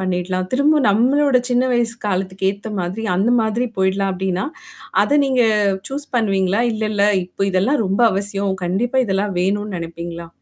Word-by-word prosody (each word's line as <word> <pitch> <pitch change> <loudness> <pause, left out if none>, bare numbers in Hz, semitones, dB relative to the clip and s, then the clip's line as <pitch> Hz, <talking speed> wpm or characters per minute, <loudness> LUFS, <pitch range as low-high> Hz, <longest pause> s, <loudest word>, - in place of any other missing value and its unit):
பண்ணிடலாம். 185 0 -2
திரும்ப 295 +3 +3
நம்மளோட 260 +6 +3
சின்ன 245 +1 +2
வயசு 235 -1 +2
காலத்துக்கு 190 0 -1
ஏத்த 205 +2 -8
மாதிரி 185 +6 -4
அந்த 210 +6 +2
மாதிரி 220 +3 0
போயிடலாம் 190 +1 +1
அப்டின்னா, 185 0 -2 0.6
அத 290 - +2
நீங்க 260 -3 +2 0.5
சூஸ் 285 +2 -4
பண்ணுவீங்களா? 195 -1 +1
இல்லல்ல, 215 -2 0 0.2
இப்ப 185 +2 -3
இதெல்லாம் 215 +8 +1
ரொம்ப 195 +4 -1
அவசியம். 195 0 0
கண்டிப்பா 235 +9 0
இதெல்லாம் 195 0 -1
வேணும்னு 205 +2 -1
நெனைப்பீங்களா? 170 0 -7
200 Hz, 145 wpm, -19 LUFS, 185-235 Hz, 0.6 s, திரும்ப